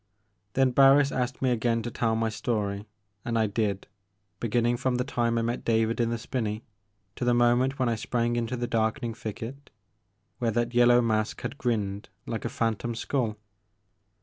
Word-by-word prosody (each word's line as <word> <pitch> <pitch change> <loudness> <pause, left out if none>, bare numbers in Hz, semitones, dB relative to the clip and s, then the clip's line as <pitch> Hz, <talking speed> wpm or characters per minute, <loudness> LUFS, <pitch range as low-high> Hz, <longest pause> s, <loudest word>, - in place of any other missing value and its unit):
Then 130 -1 +3
Barris 135 +2 +6
asked 125 +1 -2
me 130 - +3
again 115 -1 +1
to 120 - -4
tell 115 0 0
my 115 0 0
story, 105 -2 -2 0.4
and 115 -1 -1
I 110 - +3
did, 100 -2 -1 0.5
beginning 120 +1 +1
from 130 +1 0
the 125 - +1
time 120 -3 0
I 115 - +1
met 120 +1 -2
David 115 0 +1
in 115 -1 +2
the 115 - -1
spinney 110 -2 -3 0.5
to - - -4
the 120 0 +3
mo 120 0 +5
ment 130 +2 0
when 130 - +1
I 120 - +2
sprang 120 +1 -1
into 120 +1 -2
the 120 - -1
darkening 115 +1 -1
thicket 115 +6 -7 0.7
where 120 -2 +1
that 120 +2 0
yellow 120 0 +6
mask 110 -2 0
had 145 - -5
grinned 105 -6 -2 0.2
like - - -4
a - - 0
phan 115 -2 0
tom 120 +1 -4
sktdl. 115 -2 -1
120 Hz, 185 wpm, -27 LUFS, 110-125 Hz, 0.7 s, Barris